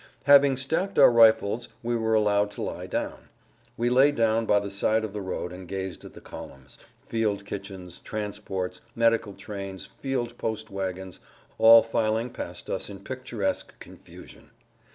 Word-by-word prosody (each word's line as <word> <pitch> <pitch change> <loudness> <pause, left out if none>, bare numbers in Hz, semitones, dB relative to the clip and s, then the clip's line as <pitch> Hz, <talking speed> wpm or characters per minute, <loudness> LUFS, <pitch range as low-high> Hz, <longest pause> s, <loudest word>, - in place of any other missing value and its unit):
Having 140 -1 +6
stacked 160 +9 -1
our - - +8
rifles 115 0 +4 0.2
we 120 +1 -1
were 110 -1 +1
allowed 105 -1 +2
to 105 - -7
lie - - -5
down. - - -4 0.5
We 120 - 0
lay 135 +3 +5
down 115 -3 +1
by 105 - +4
the 100 -1 -5
side 110 +2 +1
of 110 -2 -5
the 105 - -4
road 90 -1 -4
and 90 0 -10
gazed 95 -1 -5
at - - -11
the - - -10
columns, 65 -1 -11 0.2
field 105 -3 -1
kitchens, 95 -3 -7
transports, 100 -4 -5
medical 115 -3 +2
trains, 100 -1 -7
field 120 -3 -4
post 110 -1 -4
wagons, 95 -1 -5 0.4
all 115 0 +9
filing 115 +1 -1
past - - -7
us - - -3
in 100 -1 -9
picturesque 130 - -4
confusion. - - -14
110 Hz, 155 wpm, -26 LUFS, 100-115 Hz, 0.5 s, all